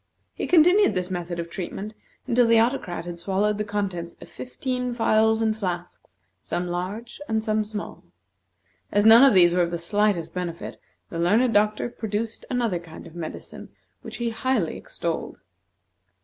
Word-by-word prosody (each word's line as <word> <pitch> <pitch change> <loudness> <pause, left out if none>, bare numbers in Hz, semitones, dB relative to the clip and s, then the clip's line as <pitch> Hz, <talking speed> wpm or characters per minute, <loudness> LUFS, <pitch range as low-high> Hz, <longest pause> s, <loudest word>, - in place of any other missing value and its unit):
He - - -4
continued 360 - +5
this 180 0 -2
method 175 -1 -4
of 170 - -3
treatment 195 +4 -6 0.3
until 245 -2 +3
the 230 0 +5
Autocrat 225 -8 -1
had 175 -1 -7
swallowed 200 +3 0
the - - +1
contents 195 -5 -3
of - - -12
fifteen 250 -1 -4
phials 220 -1 +3
and 220 -1 +1
flasks, 180 -4 -6 0.2
some 180 0 -3
large 195 +9 -5
and 220 -1 0
some 215 0 +1
small. 210 0 -7 0.9
As 205 +1 +2
none 225 +3 +9
of 270 -6 +6
these 175 -2 +6
were 180 - +3
of 170 - +1
the 170 - -3
slightest 195 -1 0
benefit, 175 -2 -5 0.3
the 165 - -4
learned 220 +8 +3
doctor 210 +2 +2
produced 220 -1 -4
another 235 -8 0
kind 165 -2 -12
of - - -12
medicine 165 -2 -8 0.3
which - - -8
he 235 -1 -2
highly 225 -6 0
extolled. 170 -1 -4
210 Hz, 165 wpm, -24 LUFS, 175-230 Hz, 0.9 s, none